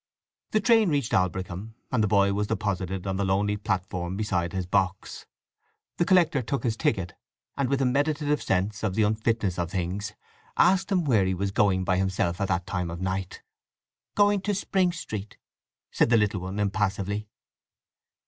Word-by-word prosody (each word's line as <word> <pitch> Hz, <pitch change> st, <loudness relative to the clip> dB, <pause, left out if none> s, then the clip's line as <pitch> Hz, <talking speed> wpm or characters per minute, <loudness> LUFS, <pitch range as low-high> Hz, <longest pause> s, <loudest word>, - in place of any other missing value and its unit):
The 215 Hz, -, +2 dB
train 225 Hz, -2 st, +4 dB
reached 140 Hz, -6 st, 0 dB
Aldbrickham, 95 Hz, +3 st, -1 dB, 0.2 s
and 120 Hz, -5 st, +2 dB
the -, -, +2 dB
boy 100 Hz, -1 st, +3 dB
was 105 Hz, +1 st, -1 dB
deposited 95 Hz, -3 st, -2 dB
on 95 Hz, -1 st, -2 dB
the 100 Hz, -, 0 dB
lonely 100 Hz, +2 st, +1 dB
platform 95 Hz, -2 st, -3 dB
beside 90 Hz, -5 st, -1 dB
his 95 Hz, -1 st, -3 dB
box. 95 Hz, 0 st, -1 dB, 0.7 s
The 170 Hz, -, +2 dB
collector 170 Hz, -7 st, +4 dB
took 125 Hz, +1 st, -3 dB
his 115 Hz, -3 st, 0 dB
ticket, 95 Hz, -6 st, -1 dB, 0.4 s
and, 140 Hz, -3 st, 0 dB
with 135 Hz, 0 st, +1 dB
a -, -, +2 dB
meditative 145 Hz, +3 st, +1 dB
sense 95 Hz, +3 st, -1 dB
of 100 Hz, -4 st, -1 dB
the 110 Hz, -, +3 dB
unfitness 110 Hz, -3 st, 0 dB
of 85 Hz, -1 st, -1 dB
things, 95 Hz, +3 st, -3 dB, 0.4 s
asked 190 Hz, +2 st, +3 dB
him 185 Hz, -3 st, +2 dB
where 110 Hz, -9 st, +3 dB
he 95 Hz, 0 st, 0 dB
was 100 Hz, +2 st, -2 dB
going 95 Hz, -2 st, +2 dB
by 90 Hz, 0 st, +1 dB
himself 95 Hz, -2 st, 0 dB
at 100 Hz, -, +1 dB
that 90 Hz, -2 st, -1 dB
time 90 Hz, -3 st, -3 dB
of 85 Hz, 0 st, -6 dB
night. 95 Hz, 0 st, -3 dB, 0.7 s
"Going 205 Hz, -1 st, +4 dB
to 205 Hz, +1 st, -1 dB
Spring 185 Hz, -2 st, +1 dB
Street," 110 Hz, -, -6 dB, 0.5 s
said -, -, +2 dB
the 115 Hz, -, +5 dB
little 105 Hz, -2 st, +1 dB
one 95 Hz, +2 st, -5 dB
impassively. 105 Hz, 0 st, -1 dB
100 Hz, 175 wpm, -26 LUFS, 95-125 Hz, 0.7 s, the